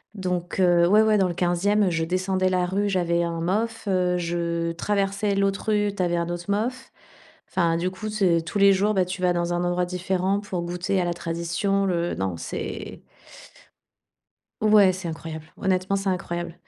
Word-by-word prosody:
Donc, 180 Hz, -1 st, -3 dB
heu, 175 Hz, -2 st, +4 dB
oui 210 Hz, +3 st, +5 dB
oui, 220 Hz, -1 st, +4 dB
dans 190 Hz, -2 st, +3 dB
le 175 Hz, -, -3 dB
15e, 185 Hz, +4 st, +2 dB
je 160 Hz, -1 st, 0 dB
descendais 185 Hz, +2 st, 0 dB
la 180 Hz, -1 st, +1 dB
rue, 200 Hz, +3 st, 0 dB
j'avais 170 Hz, -3 st, +1 dB
un 170 Hz, -1 st, -3 dB
MOF, 220 Hz, +5 st, -1 dB
heu, 180 Hz, -2 st, +1 dB
je 170 Hz, -1 st, -2 dB
traversais 200 Hz, +2 st, 0 dB
l'autre 195 Hz, +1 st, 0 dB
rue, 205 Hz, -1 st, +2 dB
tu 190 Hz, -, -2 dB
avais 175 Hz, 0 st, 0 dB
un 170 Hz, 0 st, -2 dB
autre 175 Hz, 0 st, -4 dB
MOF. 245 Hz, +6 st, -2 dB, 0.6 s
Enfin 170 Hz, -3 st, +2 dB
du 180 Hz, +2 st, -1 dB
coup, 215 Hz, +3 st, -6 dB
ce 190 Hz, -5 st, +2 dB
tous 165 Hz, +4 st, -4 dB
les 200 Hz, 0 st, +6 dB
jours, 205 Hz, +3 st, +1 dB
ben 185 Hz, -1 st, +3 dB
tu 185 Hz, +1 st, -6 dB
vas 180 Hz, -1 st, +3 dB
dans 175 Hz, 0 st, -1 dB
un 175 Hz, -, 0 dB
endroit 175 Hz, 0 st, 0 dB
différent 185 Hz, +2 st, -1 dB
pour 190 Hz, -4 st, -4 dB
goûter 180 Hz, +2 st, -1 dB
à -, -, 0 dB
la 175 Hz, -, -1 dB
tradition 170 Hz, +4 st, -1 dB
le 175 Hz, -2 st, -1 dB
Non, 95 Hz, -2 st, -2 dB
c'est -, -, -6 dB, 1.6 s
Ouais, 210 Hz, -3 st, +6 dB
c'est 185 Hz, -1 st, -6 dB
incroyable. 160 Hz, -1 st, -7 dB
Honnêtement, 190 Hz, 0 st, 0 dB
c'est 195 Hz, 0 st, -2 dB
incroyable. 175 Hz, -2 st, -3 dB
180 Hz, 185 wpm, -24 LUFS, 170-195 Hz, 1.6 s, les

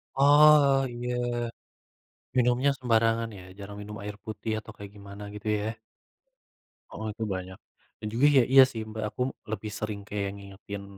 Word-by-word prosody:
Oh, 145 Hz, -1 st, +6 dB
iya. 120 Hz, +1 st, -3 dB, 1.2 s
Minumnya 125 Hz, +3 st, +3 dB
sembarangan, 115 Hz, -2 st, +2 dB
ya, -, -, -10 dB, 0.2 s
jarang 100 Hz, +1 st, -8 dB
minum 105 Hz, +1 st, -8 dB
air 105 Hz, 0 st, -5 dB
putih 110 Hz, 0 st, -5 dB
atau 110 Hz, -, -11 dB
kayak 100 Hz, -1 st, -9 dB
gimana 100 Hz, 0 st, -10 dB
gitu, 105 Hz, +1 st, -8 dB
ya. 105 Hz, -, -3 dB, 1.2 s
Oh, 110 Hz, -, -6 dB
itu 110 Hz, +2 st, -6 dB
banyak, 95 Hz, 0 st, -7 dB, 0.4 s
Iya 105 Hz, -, -8 dB
juga, 125 Hz, +5 st, +3 dB
ya, 130 Hz, -, +7 dB
iya, 135 Hz, -, +10 dB
sih, 110 Hz, -2 st, -5 dB
Mbak, 110 Hz, 0 st, -5 dB
aku 110 Hz, -, -7 dB, 0.3 s
lebih 110 Hz, -1 st, -4 dB
sering 105 Hz, -1 st, -3 dB
kayak 100 Hz, -1 st, -2 dB
ngingetin 100 Hz, 0 st, -9 dB
110 Hz, 155 wpm, -28 LUFS, 100-125 Hz, 1.2 s, iya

